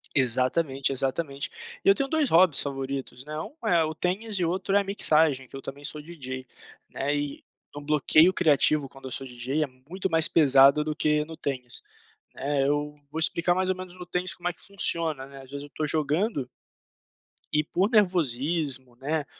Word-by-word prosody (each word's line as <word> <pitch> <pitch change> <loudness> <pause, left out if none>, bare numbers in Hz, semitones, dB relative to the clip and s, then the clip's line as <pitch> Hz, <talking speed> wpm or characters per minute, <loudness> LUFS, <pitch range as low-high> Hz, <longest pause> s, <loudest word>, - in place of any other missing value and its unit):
Exatamente, 130 +2 +2
exatamente. 135 +2 -1 0.3
E - - +4
eu 195 - +7
tenho 270 +6 -1
2 310 -2 +1
hobbies 170 -2 +5
favoritos, 135 -2 -5
né, 150 - -8
um 285 - -8
é 170 -5 +4
o 155 0 -3
tênis 195 +5 -1
e 175 - +1
outro 190 +3 -1
é - - +6
a - - 0
mixagem, 155 -8 +2
que 135 - -12
eu - - -8
também 140 +2 -8
sou 150 +1 -4
DJ, 130 -5 -7 0.5
né, 140 +2 -1
eh, 145 -1 -3 0.4
um 145 - -7
bloqueio 150 +3 +4
criativo, 155 -4 +3
quando 135 0 -14
eu 130 - -6
sou 135 - -2
DJ, 130 +4 -2
é - - -2 0.2
muito 190 +1 -3
mais 160 0 +5
pesado 140 -1 +5
do 155 0 -3
que 150 0 +1
no 160 +1 -9
tênis, 125 -5 -4 0.5
né, 140 0 0
eu 145 +1 -1 0.2
vou 155 - -6
explicar 170 +2 +3
mais 185 0 0
ou - - -1
menos 185 0 -9
no 180 - -8
tênis 180 +1 -3
como 175 0 -5
é - - -5
que - - -15
funciona, 165 -7 -1
né, 135 0 -12
as 135 - -14
vezes 140 +1 -6
eu 145 - -12
tô 155 - -1
jogando 155 - 0 1.1
e 150 - +3
por 185 +6 0
nervosismo, 150 - +1
né, 150 +3 -2
150 Hz, 195 wpm, -26 LUFS, 135-175 Hz, 1.1 s, eu